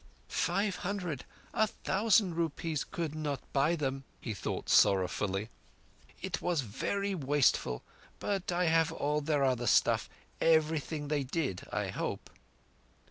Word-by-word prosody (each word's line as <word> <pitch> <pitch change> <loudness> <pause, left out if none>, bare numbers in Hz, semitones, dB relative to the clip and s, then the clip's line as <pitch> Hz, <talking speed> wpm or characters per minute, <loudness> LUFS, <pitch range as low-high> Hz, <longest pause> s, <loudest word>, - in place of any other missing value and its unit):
"Five 195 +2 0
hundred—a 185 - -2
thousand 205 -2 +2
rupees 165 -2 -1
could 165 -4 -4
not 150 -3 -2
buy 145 +5 +3
them," 135 -3 -2 0.2
he 115 - -4
thought 100 - -4
sorrowfully. 95 +2 +3 0.7
"It 185 -3 -2
was 175 -4 +1
verree 200 - -2
wasteful, 140 - +2 0.3
but 195 -3 -2
I 175 +1 +1
have 160 0 +3
all 150 -1 0
their 145 -1 +1
other 125 -3 +1
stuff—everything 155 -2 +1
they 145 -2 +1
did—I 135 - -2
hope. - - -4
155 Hz, 115 wpm, -32 LUFS, 135-175 Hz, 0.7 s, buy